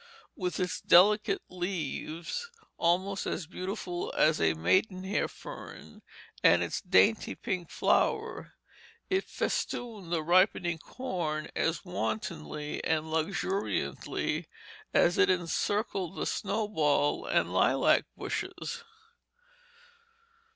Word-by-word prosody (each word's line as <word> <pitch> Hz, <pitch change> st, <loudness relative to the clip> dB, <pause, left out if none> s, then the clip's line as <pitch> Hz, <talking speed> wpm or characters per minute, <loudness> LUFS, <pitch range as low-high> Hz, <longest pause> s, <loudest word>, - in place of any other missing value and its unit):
With 180 Hz, -2 st, -3 dB
its 180 Hz, -4 st, -2 dB
delicate 205 Hz, +3 st, +5 dB
leaves, 175 Hz, -, -4 dB, 0.3 s
almost 185 Hz, +3 st, +1 dB
as 175 Hz, -, -2 dB
beautiful 180 Hz, 0 st, -4 dB
as 155 Hz, 0 st, +4 dB
a 80 Hz, 0 st, +3 dB
maidenhair 185 Hz, -, +1 dB
fern, -, -, -10 dB, 0.4 s
and -, -, +6 dB
its -, -, -3 dB
dainty 205 Hz, +3 st, +3 dB
pink 185 Hz, -7 st, -3 dB
flower, -, -, 0 dB, 0.6 s
it 385 Hz, 0 st, +2 dB
festooned 215 Hz, -8 st, -3 dB
the 165 Hz, -2 st, 0 dB
ripening 175 Hz, 0 st, +3 dB
corn 170 Hz, -9 st, -4 dB
as 165 Hz, +4 st, 0 dB
wantonly 110 Hz, -, -3 dB
and 160 Hz, 0 st, 0 dB
luxuriantly 190 Hz, +5 st, -1 dB, 0.4 s
as 175 Hz, -, +3 dB
it -, -, +5 dB
encircled 185 Hz, +1 st, 0 dB
the -, -, -2 dB
snowball 195 Hz, -9 st, 0 dB
and -, -, +1 dB
lilac -, -, +4 dB
bushes. 475 Hz, -1 st, -4 dB
180 Hz, 95 wpm, -30 LUFS, 160-200 Hz, 0.6 s, and